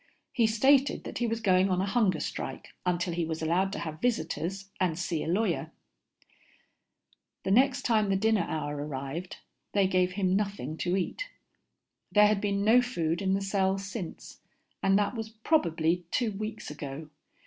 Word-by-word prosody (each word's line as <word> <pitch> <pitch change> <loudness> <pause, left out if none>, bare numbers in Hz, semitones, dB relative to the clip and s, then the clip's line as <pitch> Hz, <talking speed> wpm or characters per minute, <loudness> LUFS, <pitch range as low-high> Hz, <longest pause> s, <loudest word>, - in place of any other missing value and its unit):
He 235 -4 +3
stated 270 +5 +3
that - - -6
he 240 - +1
was 225 0 -2
going 190 -2 +4
on 180 -1 +1
a 190 - +1
hunger 200 -5 +2
strike 130 - -5 0.2
until 175 -1 0
he 170 0 -1
was 160 0 -3
allowed 180 +4 +1
to - - -3
have 155 -1 -5
visitors 195 -3 -2
and 175 -4 +1
see 175 -3 -2
a - - -5
lawyer. 185 +1 0 1.7
The 190 - -1
next 260 +4 +4
time 215 -4 +2
the 195 - +2
dinner 220 +2 +2
hour 150 -2 -2
arrived, 145 +4 -5 0.4
they 200 -1 +4
gave 185 -1 +2
him 190 -1 +1
nothing 200 -8 -2
to 180 +3 0
eat. - - -3 0.8
There 210 0 +6
had 210 -1 +2
been 200 -1 0
no 235 +3 +6
food 170 -9 -1
in 190 -1 +2
the 195 - -1
cell 195 -1 +1
since, 195 -2 -7 0.4
and 195 0 +4
that 205 +2 +1
was 225 -2 -5
probably 175 - +1
two 235 +1 0
weeks 215 -2 -5
ago. 150 0 -7
195 Hz, 170 wpm, -29 LUFS, 170-215 Hz, 1.7 s, There